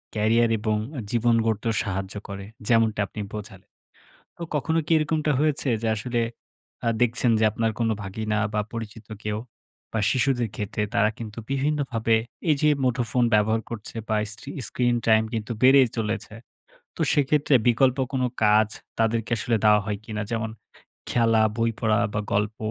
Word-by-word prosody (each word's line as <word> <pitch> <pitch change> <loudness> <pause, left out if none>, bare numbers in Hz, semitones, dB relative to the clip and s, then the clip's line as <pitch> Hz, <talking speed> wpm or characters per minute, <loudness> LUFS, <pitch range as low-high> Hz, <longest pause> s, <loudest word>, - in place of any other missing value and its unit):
Career 115 +2 +3
এবং 110 0 0 0.2
অ্যা 130 - -4
জীবন 120 0 +3
গড়তেও 110 +1 0
সাহায্য 95 -1 -4
করে, 100 0 -6 0.2
যেমনটা 115 -2 +3
আপনি 105 - -7
বোঝালেন। 100 -3 -9 0.7
তো 170 - -6
কখনো 160 +3 +1
কি - - -5
এরকমটা 155 0 0
হয়েছে 150 -2 +1
যে 115 - -1
আসলে 120 +2 -2 0.7
আ - - +4
দেখছেন 120 0 +3
যে 110 - +2
আপনার 115 +1 0
কোনো 115 -1 +2
ভাগিনা 105 +2 -2 0.2
বা 105 - +1
পরিচিত 110 -1 -7 0.2
কেউ 105 0 -1 0.6
বা 110 - 0
শিশুদের 125 -3 +1
ক্ষেত্রে 105 +1 -2
তারা 105 0 +4
কিন্তু 110 0 -7
বিভিন্নভাবে 135 -5 +1 0.3
এই 150 - +5
যে 150 - +5
মুঠোফোন 125 -1 +1
ব্যবহার 110 +1 +3
করছে 115 -1 -7
বা 110 - +2
স্ট্রি 135 +5 -8 0.2
স্ক্রিন 120 -1 +1
টাইম 110 0 +5
কিন্তু 110 +1 -3
বেড়েই 130 0 +7
চলেছে। 110 0 -3 0.6
তো - - -10
সেক্ষেত্রে 145 0 +2
বিকল্প 130 +2 +3
কোনো 130 -1 +1 0.2
কাজ 105 0 +5 0.3
তাদেরকে 115 0 0
আসলে 115 0 0
দাওয়া 105 -1 +6
হয় 105 -1 -2
কিনা? 105 -2 -4
যেমন 110 -1 -2 0.6
খেলা, 115 -2 +3 0.2
বই 115 0 +2
পড়া 110 0 +2
বা 105 - 0
গল্প? 105 +2 0
115 Hz, 160 wpm, -25 LUFS, 105-125 Hz, 0.7 s, বেড়েই